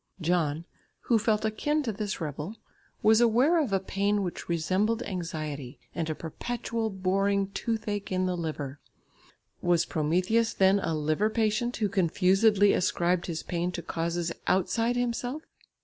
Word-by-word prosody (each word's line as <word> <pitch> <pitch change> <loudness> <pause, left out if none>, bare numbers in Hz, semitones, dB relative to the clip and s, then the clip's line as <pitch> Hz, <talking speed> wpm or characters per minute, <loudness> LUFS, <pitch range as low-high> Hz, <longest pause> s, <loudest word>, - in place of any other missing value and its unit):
John, 165 -2 0 0.4
who 230 -2 +2
felt 215 0 +1
akin 295 +8 0
to 235 - -1
this 210 -1 -4
rebel, 155 +5 -5 0.5
was 220 +2 +6
aware 255 +9 +4
of 270 -9 -2
a 195 - +2
pain 200 +2 0
which 175 -1 -5
resembled 190 +8 +1
anxiety, 155 - -5 0.2
and 165 -2 -2
a 155 - -1
perpetual 230 +7 -3
boring 195 +1 0
"toothache 210 -2 -3
in 185 0 +1
the 180 -1 0
liver." 150 -4 -4 0.8
Was 175 -1 +2
Prometheus 180 +10 +1
then 190 +1 +4
a 165 -4 -1
liver 155 +7 +1
patient 225 +2 0
who 215 - +1
confusedly 195 +3 +3
ascribed 175 0 +1
his 165 -2 -4
pain 175 0 -2
to 170 - -5
causes 170 0 -2 0.2
outside 210 +6 +1
himself? 245 +4 -2
195 Hz, 145 wpm, -28 LUFS, 170-220 Hz, 0.8 s, was